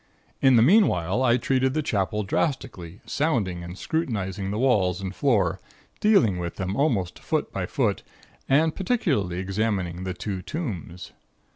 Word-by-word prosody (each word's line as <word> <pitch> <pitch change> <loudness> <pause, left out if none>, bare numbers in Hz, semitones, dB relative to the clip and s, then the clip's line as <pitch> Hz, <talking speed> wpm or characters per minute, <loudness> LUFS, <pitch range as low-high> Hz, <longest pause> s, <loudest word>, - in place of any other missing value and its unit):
In 135 -2 +6
the 115 - +6
meanwhile, 120 - +3
I 120 -2 +4
treated 130 +2 +1
the 155 - 0
Chapel 105 - -1
drastically, 100 - -3
sounding 110 - -1
and 90 +2 -8
scrutinizing 100 - -2
the 105 - -2
walls 105 -8 +2
and 95 -1 -5
floor, 120 -3 +1 0.4
dealing 120 - +3
with 85 -1 -4
them 95 +1 -3
almost 110 - 0
foot - - -2
by - - -2
foot, - - 0 0.5
and 155 +4 +3
particularly 145 - 0
examining 95 -2 -2
the 95 -1 -4
two 95 -1 -4
tombs. 90 - -6
105 Hz, 145 wpm, -25 LUFS, 90-135 Hz, 0.5 s, In